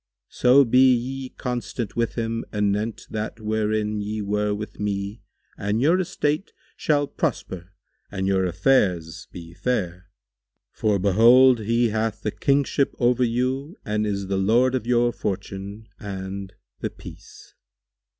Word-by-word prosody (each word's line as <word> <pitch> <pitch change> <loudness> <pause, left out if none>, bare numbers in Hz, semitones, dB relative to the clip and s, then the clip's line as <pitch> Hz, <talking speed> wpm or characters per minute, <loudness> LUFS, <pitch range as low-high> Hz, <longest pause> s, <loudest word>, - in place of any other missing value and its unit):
So 135 +3 +5
be 130 +2 +5
ye 130 +2 -4
constant 120 -4 -4
with 115 -1 -1
him 115 -1 -2
anent 105 +1 -1
that 110 +1 -4
wherein 110 -1 -1
ye 105 +1 -3
were 105 +1 0
with 105 +1 -5
me 100 +1 -3 0.4
and 105 +2 0
your 160 +8 +3
estate 155 -1 -1 0.2
shall 145 -2 +1
prosper 95 -9 -3 0.4
and 95 -1 -3
your 95 -1 +2
affairs 90 -3 +1
be 85 -1 -10
fair; 90 -5 -2 0.6
for 105 -2 +1
behold, 115 +6 +6
he 115 +2 +1
hath 110 +1 -2
the 105 - -1
Kingship 140 +2 +1
over 125 +1 +2
you 130 - -1
and 105 0 -1
is 100 -1 -2
the 95 0 -1
lord 115 +7 +3
of 125 -3 -2
your 120 0 +3
fortune, 100 +2 -5
and—The 95 -1 -7
Peace." - - -13
110 Hz, 130 wpm, -24 LUFS, 100-125 Hz, 0.6 s, behold